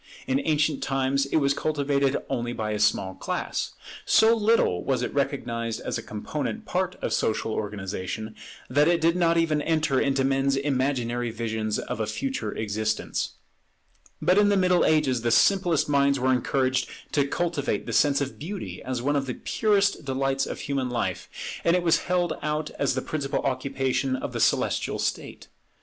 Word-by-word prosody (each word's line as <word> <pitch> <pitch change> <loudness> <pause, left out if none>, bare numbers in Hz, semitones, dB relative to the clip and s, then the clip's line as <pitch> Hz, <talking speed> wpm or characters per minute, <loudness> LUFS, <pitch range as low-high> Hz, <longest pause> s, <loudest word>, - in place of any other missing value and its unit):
In 135 +1 +1
ancient 150 -2 +1
times 135 +1 0
it - - -3
was 140 -2 +3
cultivated 140 -2 0
only 120 0 -2
by 110 -2 -3
a 105 - -2
small 95 -2 +2
class. - - -3 0.3
So 225 +1 +5
little 215 - +2
was 135 -2 0
it - - -3
recognized 120 -5 -2
as - - -3
a - - -5
component 145 - -4
part 185 -1 -1
of - - -1
social 110 0 0
organization, 105 +1 -4 0.3
that 145 +4 +3
it 170 0 +3
did 165 +1 +3
not 170 -2 +3
even 160 -3 +2
enter 155 -4 +1
into 135 -1 +1
men's 135 0 +2
imaginary 130 -3 0
visions 110 -1 -2
of - - -4
a 110 - -1
future 110 0 -3
existence. 110 0 -2 0.9
But 185 +3 +3
in 205 0 +5
the 205 - +3
Middle 180 -1 +3
Ages 145 -6 +2
the 120 - 0
simplest 175 +4 +3
minds 140 -1 +3
were 130 +1 +3
encouraged 130 0 0 0.2
to 140 -2 +2
cultivate 165 -2 -1
the - - -4
sense 145 -1 +3
of 135 -1 -4
beauty 190 +6 -6
as 125 -2 -4
one 145 +2 +1
of 140 -1 0
the 125 - -3
purest 200 -5 +1
delights 135 0 0
of - - -5
human 135 -3 -2
life; 120 -1 -2 0.3
and 170 - +4
it 180 - +1
was 165 -2 +4
held 175 -1 +1
out 150 0 -2
as 135 -2 +1
the 130 - -2
principal 145 -2 -2
occupation 135 0 -1
of 130 - -5
the - - -3
celestial - - +1
state. - - -4
140 Hz, 175 wpm, -26 LUFS, 120-155 Hz, 0.9 s, So